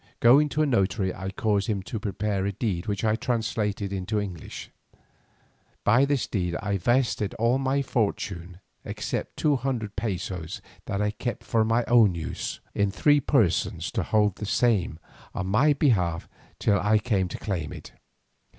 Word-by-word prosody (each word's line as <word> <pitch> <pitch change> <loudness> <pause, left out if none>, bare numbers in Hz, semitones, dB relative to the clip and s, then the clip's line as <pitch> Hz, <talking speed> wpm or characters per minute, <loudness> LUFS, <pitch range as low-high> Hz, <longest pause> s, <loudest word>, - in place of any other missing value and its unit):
Going 140 +6 +6
to 150 +3 +1
a - - +3
notary 100 -6 +1
I 95 +1 -5
caused 105 -2 0
him 100 -4 -1
to 110 - -5
prepare 100 -1 -1
a - - 0
deed 95 -2 -2
which 100 0 -2
I 110 -1 +3
translated 110 -4 -2
into 100 +3 -1
English. 95 -6 -7 1.1
By 120 +6 +5
this 140 -5 0
deed 90 -4 -2
I 100 -1 -1
vested 120 0 +1
all 115 +4 +2
my 135 +1 +1
fortune 95 -7 -2 0.2
except - - -4
two 150 -2 +2
hundred 120 -5 -3
pesos 95 -3 -4 0.3
that 100 0 -1
I 105 - +1
kept 115 +1 -4
for 110 -1 +2
my 115 +2 +1
own 115 -6 +5
use, 85 +2 -5
in 100 -1 +1
three 145 +9 +3
persons 90 - +1
to 115 - -1
hold 105 +1 +1
the 105 - -5
same 105 -9 +1 0.4
on 90 - -2
my 115 +11 +4
behalf 90 - +1 0.3
till 100 -1 +2
I 105 +1 +3
came 105 -4 0
to 85 - -6
claim 85 -8 -3
it. - - -9
105 Hz, 165 wpm, -26 LUFS, 95-120 Hz, 1.1 s, Going